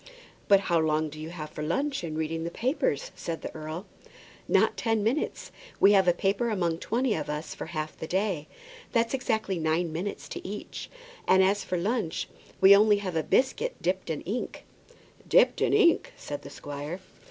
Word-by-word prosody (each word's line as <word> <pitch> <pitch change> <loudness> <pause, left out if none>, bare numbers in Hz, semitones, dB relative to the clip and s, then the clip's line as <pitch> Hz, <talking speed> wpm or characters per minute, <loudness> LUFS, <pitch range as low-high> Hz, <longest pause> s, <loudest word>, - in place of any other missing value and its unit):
"But 200 -1 +6
how 175 -3 +2
long 155 0 +1
do 155 +1 -10
you 155 +1 -6
have 155 -3 -7
for - - -7
lunch 275 - -1
and 155 -2 -4
reading 160 +1 -2
the 170 - -2
papers?" 270 - -1
said 165 -1 -5
the - - -5
earl. 155 +4 -6 0.6
"Not - - +3
ten 225 -3 0
minutes. 245 +8 -1 0.3
We 195 - +7
take 195 -2 +5
a 175 - +6
paper 200 +6 0
among 170 -6 0
twenty 240 +3 0
of 155 - -3
us 150 +2 -4
for - - -7
half 155 -2 -4
the 160 - -6
day. 185 -5 -1 0.5
That's 230 0 +2
exactly 220 -8 -1
nine 160 +1 0
minutes 185 +5 -4
to - - -6
each; 205 +2 -6 0.4
and 190 0 +6
as 200 +2 +2
for 180 - -2
lunch, 200 -1 -1 0.3
we 195 +1 +9
only 210 0 +5
have 190 -4 -4
a 160 - +2
biscuit 275 - +1
dipped 185 0 -1
in 155 -3 -2
ink." 220 +7 -4 0.6
"Dipped - - +4
in - - +3
ink!" 420 +5 +4
said - - -6
the - - -10
squire. 145 +4 -6
185 Hz, 185 wpm, -28 LUFS, 160-220 Hz, 0.6 s, we